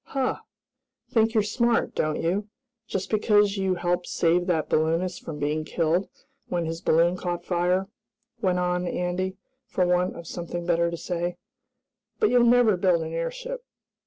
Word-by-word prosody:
"Huh! 265 Hz, -2 st, -1 dB, 0.7 s
Think 225 Hz, -1 st, +2 dB
you're 215 Hz, -, +4 dB
smart, 235 Hz, +2 st, +1 dB
don't 155 Hz, 0 st, 0 dB
you? 195 Hz, +5 st, -1 dB, 0.4 s
Just 195 Hz, 0 st, -3 dB
because 210 Hz, -1 st, +3 dB
you 190 Hz, -1 st, +1 dB
helped 175 Hz, 0 st, -1 dB
save 175 Hz, +2 st, +2 dB
that 160 Hz, -4 st, +1 dB
balloonist 165 Hz, +3 st, 0 dB
from 155 Hz, -3 st, -6 dB
being 150 Hz, +2 st, -1 dB
killed 170 Hz, +4 st, 0 dB, 0.4 s
when 175 Hz, -1 st, -1 dB
his 165 Hz, +1 st, -4 dB
balloon 170 Hz, +2 st, +3 dB
caught 175 Hz, -1 st, -4 dB
fire," 180 Hz, +2 st, +1 dB, 0.5 s
went 185 Hz, -3 st, +2 dB
on 180 Hz, 0 st, 0 dB
Andy, 180 Hz, +2 st, -2 dB, 0.3 s
for 185 Hz, -, +1 dB
want 180 Hz, +1 st, +1 dB
of 170 Hz, -, -9 dB
something 175 Hz, 0 st, -5 dB
better 170 Hz, -1 st, +2 dB
to 170 Hz, -, -4 dB
say. 175 Hz, 0 st, -3 dB, 0.8 s
"But 430 Hz, -, +3 dB
you'll 245 Hz, -1 st, +5 dB
never 235 Hz, -4 st, +5 dB
build 175 Hz, -3 st, +2 dB
an 160 Hz, 0 st, -6 dB
airship!" -, -, -4 dB
180 Hz, 160 wpm, -26 LUFS, 170-200 Hz, 0.8 s, you'll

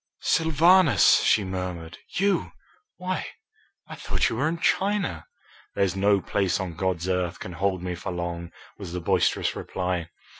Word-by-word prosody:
"Sylvanus!" 165 Hz, +2 st, +5 dB
she 105 Hz, -, +3 dB
murmured. 90 Hz, -3 st, -5 dB, 0.2 s
"You! 200 Hz, +1 st, +1 dB, 0.4 s
Why, 185 Hz, +1 st, -3 dB, 0.6 s
I -, -, -9 dB
thought -, -, -1 dB
you 115 Hz, -, -4 dB
were 145 Hz, +5 st, +1 dB
in 165 Hz, +1 st, -1 dB
China." 190 Hz, -, 0 dB, 0.5 s
"There's 100 Hz, -2 st, +1 dB
no 100 Hz, +1 st, +3 dB
place 95 Hz, -2 st, 0 dB
on 95 Hz, -3 st, -4 dB
God's 90 Hz, 0 st, -2 dB
earth 90 Hz, -1 st, -1 dB
can 90 Hz, -, -7 dB
hold 95 Hz, 0 st, -1 dB
me 90 Hz, -1 st, -3 dB
for 90 Hz, -, -5 dB
long," 85 Hz, -1 st, -4 dB, 0.3 s
was 90 Hz, -4 st, -7 dB
the 90 Hz, -, -2 dB
boisterous 85 Hz, -, +1 dB
reply. 90 Hz, -3 st, -3 dB
95 Hz, 150 wpm, -25 LUFS, 90-145 Hz, 0.6 s, Sylvanus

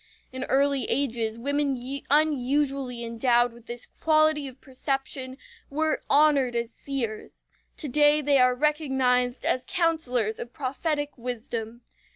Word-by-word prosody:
In 260 Hz, +1 st, -4 dB
early 275 Hz, -2 st, +2 dB
ages 230 Hz, -4 st, -1 dB
women 280 Hz, +2 st, 0 dB, 0.3 s
unusually 275 Hz, -3 st, +1 dB
endowed 235 Hz, +1 st, +2 dB
with 235 Hz, 0 st, -17 dB
this 240 Hz, 0 st, -6 dB
quality 310 Hz, -2 st, +3 dB
of 260 Hz, 0 st, -11 dB
perception 265 Hz, -1 st, -3 dB, 0.3 s
were 310 Hz, +2 st, 0 dB
honored 280 Hz, -4 st, +4 dB
as 235 Hz, 0 st, -2 dB
seers. 240 Hz, -6 st, -5 dB, 0.3 s
To 305 Hz, -, -4 dB
day 295 Hz, +2 st, +4 dB
they 285 Hz, -2 st, +3 dB
are 250 Hz, 0 st, +4 dB
recognized 265 Hz, -4 st, +1 dB
as 255 Hz, -, +1 dB
counselors 290 Hz, -, 0 dB
of 240 Hz, -, -7 dB
prophetic 290 Hz, +3 st, -2 dB
wisdom. 235 Hz, -1 st, -5 dB
265 Hz, 125 wpm, -26 LUFS, 245-290 Hz, 0.3 s, honored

